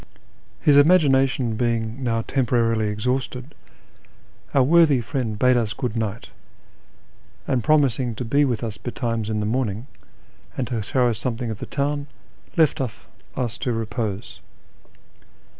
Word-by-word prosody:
His 145 -2 +4
imagination 135 -6 +4
being 115 +1 -1
now 115 -2 0
temporarily 115 -4 +1
exhausted, 125 +5 -3 1.0
our 135 - +4
worthy 155 -1 +5
friend 120 -3 -3
bade 125 +3 +4
us 115 -2 0
good 125 -4 -3
night; 110 -1 -3 1.2
and, 125 -3 0
promising 135 -6 +2
to 125 - -4
be 140 +6 +3
with 125 -4 -1
us 110 -2 -5
betimes 115 -3 -3
in 105 -1 -1
the - - -1
morning, 115 -1 -1 0.7
and 130 - 0
to 115 -4 -1
show 125 +4 +1
us 115 -3 -1
something 120 -1 -3
of 105 - -6
the - - -6
town, 145 0 -2 0.5
left 160 -4 +3
us 120 0 -6
to 125 - -1
repose. 110 -2 -4
120 Hz, 135 wpm, -23 LUFS, 115-135 Hz, 1.2 s, worthy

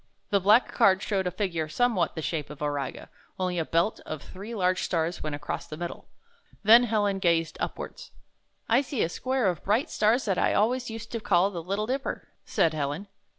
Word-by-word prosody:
The 200 - +4
black 210 +6 +4
card 195 -5 +4
showed 190 -3 0
a - - +2
figure 175 -4 -2
somewhat 225 -2 +1
the 160 - -4
shape 155 -2 -2
of 150 - -10
Auriga, 145 -2 -3 0.3
only 180 -1 0
a - - +1
belt 170 +8 +1
of 155 -2 -6
three 205 +5 -8
large 185 -2 +1
stars 170 0 -1
went 155 -1 -3
across 145 0 -5
the 155 - -7
middle. 175 0 -6 0.6
Then 230 +4 +8
Helen 205 -3 +1
gazed 165 -3 +1
upwards. - - -5 0.6
'T 235 +4 +4
see 270 -3 -1
a 165 - 0
square 260 +5 -1
of 180 -5 0
bright 215 +7 +1
stars 225 +5 +2
that 195 -4 0
I - - +2
always 245 +4 +1
used 225 0 -7
to 230 - -2
call 195 -2 +3
the 175 -3 -5
Little 200 +5 -2
Dipper," 270 +4 -3 0.2
said 160 - +2
Helen. 155 +6 -3
190 Hz, 195 wpm, -27 LUFS, 165-225 Hz, 0.6 s, Then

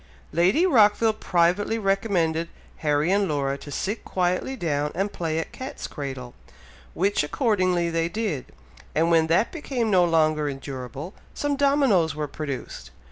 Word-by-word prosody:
Lady 185 - +3
Rockville 220 - +4
privately 185 +2 +1
recommended 190 -6 0 0.3
Harry 150 +2 +1
and 200 0 +2
Laura 140 -2 0
to 145 - -10
sit 200 +9 -3
quietly 185 +8 -1
down 150 - -1
and 195 +3 -1
play 160 -2 -2
at 165 - -3
cat's 260 +1 -7
cradle, 130 -4 -6 0.6
which 200 +3 +2
accordingly 185 - +1
they 165 0 0
did, 185 - -2 0.5
and 165 +2 +2
when 160 -1 +4
that 170 +8 +2
became 255 -9 -2
no 185 -2 +5
longer 155 -3 +2
endurable, 135 - -7 0.2
some 290 -1 -1
dominos 270 - +3
were 150 -1 -3
produced. 140 - -6
170 Hz, 140 wpm, -25 LUFS, 150-205 Hz, 0.6 s, no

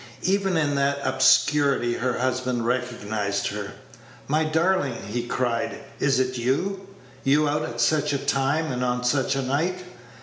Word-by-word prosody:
Even 195 -1 +1
in 150 -2 +1
that 140 0 +1
obscurity 140 -5 +3
her 125 +1 -1
husband 125 -1 -1
recognized 110 -5 -1
her. 100 -1 -5 0.5
"My 155 +3 +2
darling," 160 -4 +1
he 120 +2 -3
cried, 120 -2 -1 0.2
"is 140 -2 +2
it 130 -1 -1
you? 190 +11 -1 0.4
You 150 +3 +3
out 150 +1 0
at 120 -5 -5
such 150 +4 +2
a 140 - +1
time, 140 +3 0
and 125 0 -2
on 125 0 -1
such 135 +2 +1
a 135 - -1
night! 165 +8 -1
135 Hz, 155 wpm, -24 LUFS, 120-150 Hz, 0.5 s, obscurity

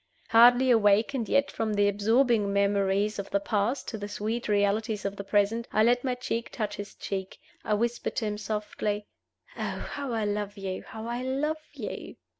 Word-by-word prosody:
Hardly 245 +3 +7
awakened 225 +3 +3
yet 280 0 +2
from 220 -2 -1
the 205 0 +4
absorbing 215 +1 +2
memories 200 +1 +1
of 200 - -5
the 200 - +1
past 215 +6 -1
to 220 - -5
the 205 - -4
sweet 220 +3 -3
realities 210 +1 +1
of 200 0 -2
the 200 - -6
present, 205 +3 +1
I 215 - +3
let 245 +2 +3
my 255 -2 0
cheek 235 -2 -3
touch 215 -3 -3
his 205 0 -7
cheek, 190 -1 -5 0.3
I 210 - +1
whispered 235 +2 -1
to 225 - -1
him 210 0 -2
softly, 210 -1 -3 0.5
"Oh, - - -3
how 280 -3 -4
I 225 -2 0
love 205 0 -2
you! 190 -1 -4
how 220 0 -9
I 240 +1 -3
love 290 +5 -1
you!" - - -6
215 Hz, 185 wpm, -28 LUFS, 205-235 Hz, 0.5 s, Hardly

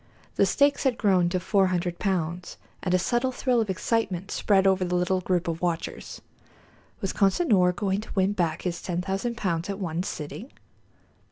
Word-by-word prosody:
The - - +3
stakes 285 0 +2
had 260 -4 +1
grown 185 -5 +3
to 185 +1 0
four 190 +2 +2
hundred 175 -1 -2
pounds, 180 -2 -2 0.2
and 185 - -2
a 185 - +4
subtle 240 +7 0
thrill 250 -2 +1
of 215 - -3
excitement 190 -1 -1
spread 195 -2 +2
over 190 -1 +3
the 180 0 -1
little 180 +1 +1
group 180 -1 0
of 165 0 -3
watchers. 170 -2 -3 0.8
Was 195 - -2
Consinor 195 - +3
going 190 +2 -1
to - - -12
win 195 +1 +2
back 170 -5 -1
his 175 -2 -3
ten 175 -1 -2
thousand 195 +5 -2
pounds 170 -4 -2
at 200 - -3
one 175 -4 -2
sitting? 180 - -6
185 Hz, 180 wpm, -26 LUFS, 175-205 Hz, 0.8 s, a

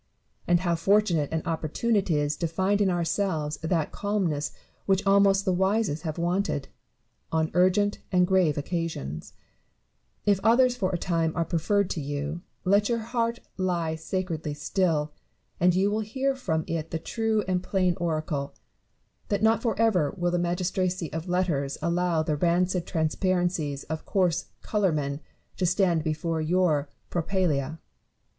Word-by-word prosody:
— - - -36
and 175 0 +3
how 175 -2 +1
fortunate 170 -3 +2
and 160 -1 -2
opportune 165 +8 -1
is 150 -7 +1
it - - -21
to 170 - 0
find 190 +5 +1
in 195 - +3
ourselves 170 -3 -1
that 160 -1 -1
calm 205 -1 -1
ness 145 -3 -1 0.4
which 195 +1 +2
almost 195 0 +4
the 185 - +2
wisest 190 -3 +1
have 160 -1 -4
wanted, 175 -4 -1 0.6
on 160 0 +1
urgent 185 +3 +3
and 180 -1 +4
grave 180 -5 +2
occasions 145 - -4 0.9
1 205 - +3
If 195 - +2
others 245 +3 +5
for 195 -6 0
a 180 - -1
time 165 -2 0
are 165 -1 0
preferred 200 +5 +1
to 160 - -2
you, 145 +3 -4 0.2
let 200 +3 +3
your 235 - +2
heart 230 +1 -2 0.2
lie 175 -4 0
sacredly 160 -2 -3
still; 155 -1 0 0.5
and 180 +1 +4
you 195 +2 +2
will 215 - 0
hear 265 +6 -1
from 160 -12 -1
it 165 -1 -3
the 165 - -2
true 220 +5 -1
and 180 -1 +1
plain 185 -2 +1
oracle, 155 -4 -2 0.7
that 205 +1 -1
not 225 0 +4
for 230 -3 -1
ever 190 -10 +2
will 175 -1 0
the 175 - +1
magistracy 180 -1 -1
of 165 +3 -4
letters 165 -7 0
allow 170 -1 +1
the 155 -1 -1
rancid 175 +2 +1
transparencies 165 -3 0
of 160 0 -6
coarse 180 -3 +1 0.2
colourmen 155 -9 0 0.4
to 185 - 0
stand 180 -3 +2
before 160 +1 -1
your 155 -3 +1 0.2
propylsea. 165 -5 0
175 Hz, 155 wpm, -27 LUFS, 160-195 Hz, 0.9 s, others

